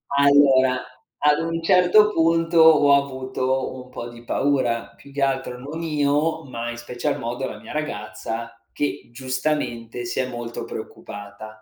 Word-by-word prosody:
Allora, 140 -2 +5 0.4
ad 150 0 +4
un 165 0 -2
certo 185 +4 +5
punto 165 0 +2
ho 155 -3 +7
avuto 130 -1 -1
un 130 0 -10
po' 120 - -7
di 120 0 -13
paura, 125 -3 0
più 140 - -16
che 140 0 -4
altro 135 -2 -1
non 150 +5 -6
io, 150 +1 +1
ma 120 -2 -5
in 120 - -7
special 120 +1 -3
modo 120 +3 -3
la - - -8
mia - - -10
ragazza 115 -4 -5 0.2
che 145 - -3
giustamente 130 -2 -3
si 120 - -3
è 130 - 0
molto 120 -1 -6
preoccupata. 100 +1 -9
130 Hz, 150 wpm, -23 LUFS, 120-150 Hz, 0.4 s, ho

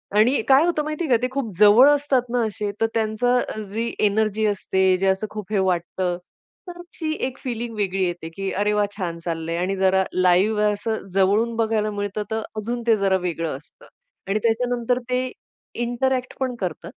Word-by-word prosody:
आणि 230 +6 +4
काय 275 +4 +6
होतं 340 -3 0
माहितीये 305 +1 -3
का 245 - +5
ते 250 - +1
खूप 265 -5 -3
जवळ 215 +6 +8
असतात 290 -3 +2
ना 245 - +1
असे, 210 -1 -3
तर - - +5
त्यांचं 230 +3 +1 0.3
जी 230 +3 -2
अ, - - -7
एनर्जी 215 +1 +1
असते, 190 -2 +2
जे 195 +1 0
असं 190 +3 +1
खूप 210 -1 -8
हे 205 - +2
वाटतं, 180 -1 -1 0.5
तर 350 0 -8 0.2
ती 315 -2 -1 0.2
एक 260 - -8
फीलिंग 235 -2 -5
वेगळी 195 -2 -1
येते, 175 -2 -4
की 190 +3 -4
अरे 205 +2 +1
वाह! 210 0 +2
छान 170 -4 -4
चाललंय 165 0 -3
आणि 185 +3 -1
जरा 190 0 +3
लाईव्ह 185 +4 +3
आहे, 210 0 +3
असं 220 0 -4
जवळून 205 +5 +2
बघायला 220 -2 0
मिळतं, 205 0 -3
तर 220 - -1 0.2
अजून 235 +3 -3
ते 225 - +6
जरा 195 -1 +2
वेगळं 165 -5 -2
असतं 180 - -20 0.4
आणि 200 +2 0
त्याच्यानंतर 245 +1 +1
ते 255 0 0 0.5
इंटरॅक्ट 255 +1 -1
पण 260 -2 -1
करत 175 -3 -4
215 Hz, 185 wpm, -23 LUFS, 190-245 Hz, 0.5 s, जवळ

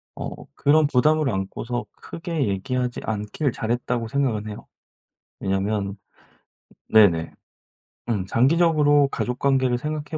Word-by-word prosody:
어 - - -4 0.2
그런 155 +2 +3
부담을 150 +2 +3
안고서 115 +4 -3
크게 165 -5 -4
얘기하지 125 +5 -2
않기를 110 +7 -2
잘했다고 120 +1 -2
생각은 115 -4 -1
해요. 105 - -8 0.7
왜냐면 100 +1 -1 0.9
네네. 90 -7 +5 0.8
음 100 -5 0
장기적으로 145 - +4
가족관계를 130 0 +1
생각해 150 +3 -4
125 Hz, 270 characters per minute, -23 LUFS, 105-145 Hz, 0.9 s, 네네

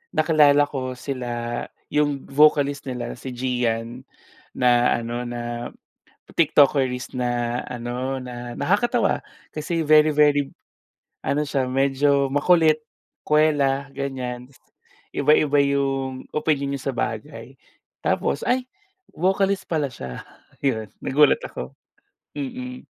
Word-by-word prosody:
nakilala 150 -2 +5
ko 130 -3 -4
sila 120 -2 -4 0.3
'yong 145 -2 0
vocalist 145 -1 +3
nila, 125 -2 -4
si 130 - -6
Gian, 120 0 -2 0.5
na 120 -1 +3
ano 120 +1 -4
na 120 0 -5 0.7
TikTokerist 135 -5 +3
na 120 0 -1
ano, 125 +2 -4
na 120 -1 -7
nakakatawa 205 - +1 0.3
kasi 165 +2 -2
very, 155 0 +5
very, 145 -2 +3 0.7
ano 150 +1 0
siya 135 -2 -1
medyo 140 +1 +2
makulit, 155 0 +4 0.4
kuwela 145 -3 +2
ganiyan. 125 -2 -5
Tas 135 - -22 0.5
iba-iba 145 0 +3
'yong 135 -2 -1
opinyon 145 -2 0
niya 135 0 -4
sa - - -10
bagay. 115 +3 -4 0.5
Tapos 70 - 0
ay, 250 0 +1 0.5
vocalist 190 +2 +1
pala 155 -4 0
siya. 65 - -7 0.4
'Yon 110 -7 -1
nagulat 150 - +4
ako. - - -7 0.6
Mm. 255 -2 -6
140 Hz, 105 wpm, -23 LUFS, 125-150 Hz, 0.7 s, nakilala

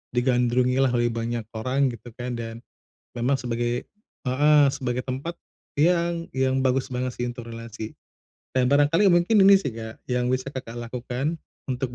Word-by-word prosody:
digandrungi 125 +1 +2
lah 135 - +4
oleh 120 0 +2
banyak 115 0 -3
orang, 130 +4 +1
gitu 120 +1 -10
kan 125 0 -4
dan 115 0 -6 0.6
memang 125 +4 +2
sebagai 120 -1 -1 0.5
heeh, 145 +3 +5
sebagai 125 -2 -2
tempat 135 +6 -4 0.4
yang 170 +2 +2
yang 130 0 +2
bagus 130 0 +1
banget 125 +1 -1
sih 120 - -2
untuk 120 -1 -6
relasi 115 -1 -7 0.6
dan 130 -1 +4
barangkali 145 +8 +4
mungkin 175 +4 +4
ini 200 - +9
sih 140 - -2
Kak, 110 -1 -8
yang 125 0 +1
bisa 130 +1 -1
Kakak, 130 -4 -7
lakukan 125 +6 -3 0.3
untuk 125 -1 -2
125 Hz, 155 wpm, -25 LUFS, 120-140 Hz, 0.6 s, ini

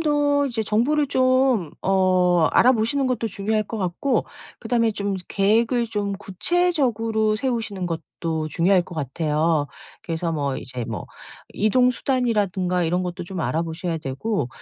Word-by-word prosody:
더 290 -2 +2
이제 235 -4 -2
정보를 275 +8 +1
좀 255 - +2
어 185 -3 +3
알아 255 - +6
보시는 260 +4 0
것도 245 -3 -1
중요할 215 +2 -1
것 225 +2 -6
같고 190 +8 0 0.3
그다음에 230 -2 +1
좀 200 -1 -2
계획을 225 +4 +2
좀 205 -2 -2
구체적으로 220 - +1
세우시는 225 -6 -2
것도 160 -1 -4
중요할 180 +4 +3
것 175 - -11
같아요. 155 +1 0 0.4
그래서 165 0 -2
뭐 140 -4 -1
이제 125 -1 -6
뭐 115 - -5 0.5
이동 250 +4 +3
수단이라든가 205 -9 0
이런 175 +3 0
것도 180 -1 -4
좀 185 0 -5
알아 160 +1 0
보셔야 165 0 -3
되고 140 - -2
200 Hz, 310 characters per minute, -23 LUFS, 170-240 Hz, 0.5 s, 알아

